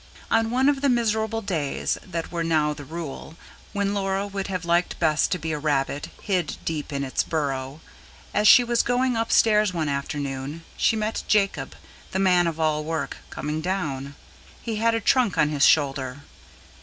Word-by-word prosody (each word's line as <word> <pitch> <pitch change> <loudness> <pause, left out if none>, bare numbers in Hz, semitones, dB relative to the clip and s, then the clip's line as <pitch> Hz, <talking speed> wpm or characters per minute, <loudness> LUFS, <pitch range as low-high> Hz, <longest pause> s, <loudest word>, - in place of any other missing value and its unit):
On 225 0 +3
one 255 +3 +2
of 285 -2 +2
the 280 - +3
miserable 225 -2 0
days 160 -8 -2
that 170 -3 -5
were 170 -1 -2
now 155 -2 +2
the 145 - -9
rule, 160 0 -7 0.4
when 200 -1 -1
Laura 195 0 -1
would 200 -1 -4
have 185 -3 -3
liked 170 +1 +1
best 155 -2 +2
to 180 - +1
be 160 -1 -4
a 150 - -2
rabbit, 145 -1 -1
hid 185 -4 -1
deep 155 -3 -3
in 140 -1 -2
its 130 - 0
burrow; 140 -2 -3 0.5
as 210 +1 +3
she 245 - +9
was 240 0 +2
going 250 0 +1
upstairs 215 -3 +3
one 155 -3 -1
afternoon, 140 +2 -4
she 225 - +2
met 215 0 -2
Jacob, 200 -2 +1 0.4
the - - 0
man 180 -2 +4
of 165 -1 -3
all 155 -1 +1
work, 160 -1 -3
coming 150 +1 -4
down. 145 -7 -3 0.5
He 225 -2 -3
had 230 +1 +2
a - - +1
trunk 230 -1 +2
on 150 - +3
his 145 -2 +4
shoulder. 135 -2 +1
170 Hz, 180 wpm, -24 LUFS, 150-210 Hz, 0.5 s, she